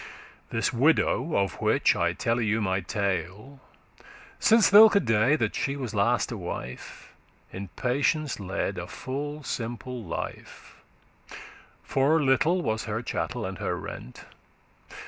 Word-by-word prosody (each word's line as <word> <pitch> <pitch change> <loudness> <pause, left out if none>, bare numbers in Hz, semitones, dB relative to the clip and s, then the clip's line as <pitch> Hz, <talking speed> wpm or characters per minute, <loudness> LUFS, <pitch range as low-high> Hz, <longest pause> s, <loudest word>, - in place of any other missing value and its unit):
This 115 +3 -1
widow, 155 +4 +2
of 100 -3 -1
which - - +3
I - - +1
telle 115 +1 -1
you 110 0 +1
my 95 -3 0
tale, 100 - -3 0.8
Since 225 -2 +5
thilke 210 0 +8
day 110 +6 +3
that 115 -8 -1
she 140 - -2
was 130 -6 -5
last 115 +5 +1
a 115 - -4
wife, 65 -9 -8 0.4
In 95 +1 -6
patience 140 +2 0
led 100 0 -3
a - - -6
full 145 +3 -5
simple 120 0 -5
life, 85 - -7 1.1
For 140 +4 +2
little 155 +6 +2
was 110 -4 -2
*her 110 +1 -3
chattel 120 -1 -3
and 95 -1 -6
her - - -2
rent. 65 - -9
120 Hz, 130 wpm, -26 LUFS, 100-140 Hz, 1.1 s, thilke